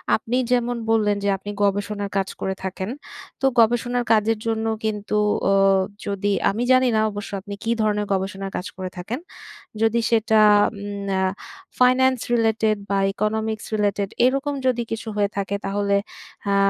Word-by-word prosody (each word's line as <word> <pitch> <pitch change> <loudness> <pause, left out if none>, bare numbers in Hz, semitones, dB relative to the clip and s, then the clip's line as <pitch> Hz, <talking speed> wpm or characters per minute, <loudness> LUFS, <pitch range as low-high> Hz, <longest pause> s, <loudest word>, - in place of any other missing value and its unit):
আপনি 235 +3 -2
যেমন 245 0 +1
বললেন 215 -2 +3
যে - - 0
আপনি 205 +2 -7
গবেষণার 205 0 -1
কাজ 195 -1 0
করে 190 - -1
থাকেন 190 +1 -4 0.5
তো 270 - +1
গবেষণার 240 +2 +2
কাজের 220 0 +2
জন্য 225 0 -1 0.2
কিন্তু 210 -1 -2 0.3
উ - - +4 0.5
যদি 200 0 -1 0.2
আমি 220 +5 -1
জানি 255 0 +5
না 215 - +3
অবশ্য 205 0 -7
আপনি 200 +1 -8
কী 230 - 0
ধরনের 210 -1 +1
গবেষণার 195 0 -3
কাজ 180 - -5
করে 185 -1 -4
থাকেন? 220 - -4 0.6
যদি 225 +1 +3
সেটা 220 -1 +3 0.4
উম 200 -2 -1 0.5
ফাইনান্স 255 0 +4
রিলেটেড 220 -2 +2
বা 200 - +1 0.2
ইকোনমিক্স 220 +1 -2
রিলেটেড 205 -1 0 0.2
এরকম 275 +3 +1
যদি 240 -2 +1
কিছু 225 0 -4
হয়ে 205 -1 +1
থাকে 200 0 -1
তাহলে 200 0 0 0.6
আ - - +3
210 Hz, 150 wpm, -22 LUFS, 200-230 Hz, 0.6 s, জানি